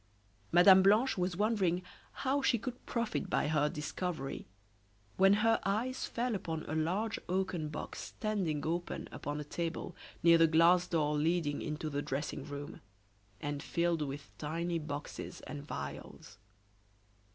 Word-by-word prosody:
Mme. 185 +2 +8
Blanche 215 +7 +4
was 180 -1 -1
wondering 195 -4 +1 0.4
how 275 +2 +2
she 255 -3 +3
could 250 +2 -7
profit 230 -5 -1
by 150 - +1
her 150 -1 +2
discovery, 150 0 -4 0.7
when 195 +1 +6
her 225 0 +4
eyes 225 +7 -1
fell 245 0 -1
upon 165 -5 -3
a - - -5
large 185 +8 0
oaken 180 -4 -1
box 155 - -6
standing 190 -9 -2
open 170 +2 -2
upon 145 +1 -4
a - - -3
table 165 +3 -4 0.3
near 170 0 +7
the 165 - +7
glass 170 +3 +5
door 150 -3 +1
leading 155 -1 +1
into 155 0 -3
the 145 -1 -2
dressing 140 +2 -3
room, 145 0 -7 0.6
and 145 -1 -3
filled 170 -1 0
with 140 0 -5
tiny 165 +3 -2
boxes 145 -1 -6
and 145 0 -8
vials. 70 +8 -7
170 Hz, 140 wpm, -33 LUFS, 150-190 Hz, 0.7 s, Mme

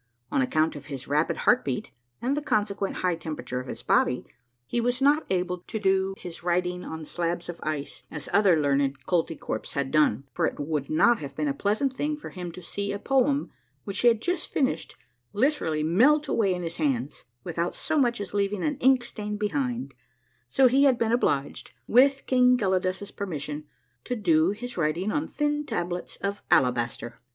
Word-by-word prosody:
On - - +2
account 155 +5 +1
of 145 -1 -9
his 135 -4 -6
rapid 150 +3 +1
heart 250 - +5
beat, 130 -3 -3 0.3
and 265 +3 +1
the 295 - -1
consequent 205 -7 -1
high 180 - +3
temperature 150 -6 -5
of 130 - -7
his - - -7
body, 125 - +2 0.4
he 240 - -1
was 245 +1 0
not 290 +3 +3
able 180 -1 0
to 220 - -3
do 195 -1 +1
his 175 -2 -8
writ 175 +1 +1
ing 180 0 -4
on 160 -1 -6
slabs 170 +1 -2
of 175 - -6
ice 150 -2 -4
as 150 -2 -6
other 195 -5 +5
learned 140 -2 +1
Koltykwerps 165 -3 -2
had 140 -1 -2
done, 155 -2 +3
for - - +1
it - - -5
would 145 -1 -2
not 235 +9 +4
have 140 -2 -7
been 150 0 -1
a 140 - +1
pleasant 215 - 0
thing 295 +2 -1
for 295 - -9
him 180 -2 -6
to 180 - -10
see 200 +3 -3
a 200 - -2
poem 270 +5 +1 0.3
which 200 -1 -4
he 245 - +4
had 230 -2 +4
just 355 -1 -1
finished 265 -3 -1 0.4
literally 205 - +1
melt 265 - +4
away 210 -7 +2
in 180 - -5
his 165 0 -4
hands, 140 -3 -1 0.2
without 170 +1 -2
so 315 - -2
much 240 -4 +2
as 200 -2 -6
leaving 200 -1 0
an 295 -3 0
ink 260 -1 +4
stain 210 -3 -5
behind, 245 +3 -2 0.5
so 265 -1 +5
he 270 +3 +4
had 260 -3 +4
been 230 -1 +1
obliged, 145 - 0
with 270 +3 +4
King 250 -1 +4
Gelidus' 190 -1 -1
permission, 150 -5 -4 0.4
to 250 - -2
do 170 -6 +3
his 245 +4 -5
writing 170 +5 0
on 295 +5 -1
thin 295 0 -1
tablets 175 -7 -3
of 200 +1 -4
alabaster. 120 -2 +1
190 Hz, 190 wpm, -26 LUFS, 155-245 Hz, 0.5 s, heart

